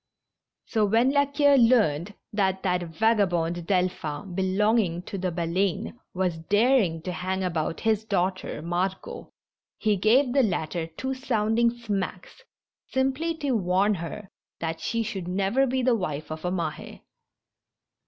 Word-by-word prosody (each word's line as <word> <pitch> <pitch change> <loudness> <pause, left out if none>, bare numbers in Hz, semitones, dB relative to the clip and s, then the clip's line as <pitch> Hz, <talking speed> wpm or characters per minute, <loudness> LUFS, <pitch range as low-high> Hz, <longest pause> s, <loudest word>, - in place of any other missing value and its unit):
So 220 -2 0
when 225 +5 +3
La 285 0 +3
Queue 285 0 +4
learned 210 - +3 0.2
that 190 -2 0
that 180 -1 +1
vagabond 175 -3 0
Delphin, 180 -2 -1
belong 195 +5 +2
ing 175 -4 -1
to 195 - -7
the 185 0 -1
Baleine^ 180 +5 -1 0.2
was 180 -3 -1
daring 205 -2 +2
to 180 - -3
hang 190 +1 -2
about 165 -2 -2
his 220 -1 +1
daughter, 185 -6 -2
Margot, 180 +3 -3 0.5
he 215 -2 +1
gave 245 +6 +3
the 275 - +5
latter 170 - -1
two 260 +12 -4
sounding 235 -3 +1
smacks, 205 -6 -5 0.5
simply 270 +5 0
to 285 -3 -2
warn 195 -1 +2
her 190 +3 -6 0.3
that 165 -1 -3
she 230 0 -1
should 190 -5 -5
never 200 +9 +1
be 260 0 0
the 250 0 +4
wife 155 -7 -4
of 155 0 -6
a 180 - 0
Mahe. 165 -4 -4
195 Hz, 145 wpm, -26 LUFS, 175-230 Hz, 0.5 s, the